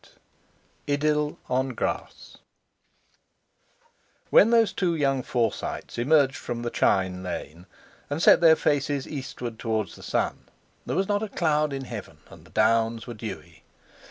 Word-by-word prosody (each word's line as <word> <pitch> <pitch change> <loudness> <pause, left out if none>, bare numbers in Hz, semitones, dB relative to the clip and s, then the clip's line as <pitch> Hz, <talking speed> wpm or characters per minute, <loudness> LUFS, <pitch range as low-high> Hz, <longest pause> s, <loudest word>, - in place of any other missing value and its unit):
—IDYLL 150 +1 0
ON 130 0 -1
GRASS - - -4 1.9
When 215 - +7
those 230 -2 +4
two 175 -3 0
young 135 -3 +1
Forsytes 120 -2 -2
emerged 140 +1 +3
from 120 0 -5
the 120 - -3
chine 95 -1 +1
lane, 90 -1 -7 0.4
and 145 +2 -2
set 170 - +6
their 160 -2 +7
faces 145 -2 0
east 135 -3 -6
toward 110 -4 -3
the - - -13
sun, - - -2 0.4
there - - -2
was 190 0 +1
not 205 0 0
a 220 - -3
cloud 155 -5 +1
in 135 -1 -4
heaven, 115 -5 -8
and - - -14
the - - -18
Downs 115 +1 +2
were 120 - -7
dewy. 95 -7 -8
130 Hz, 140 wpm, -26 LUFS, 115-150 Hz, 1.9 s, When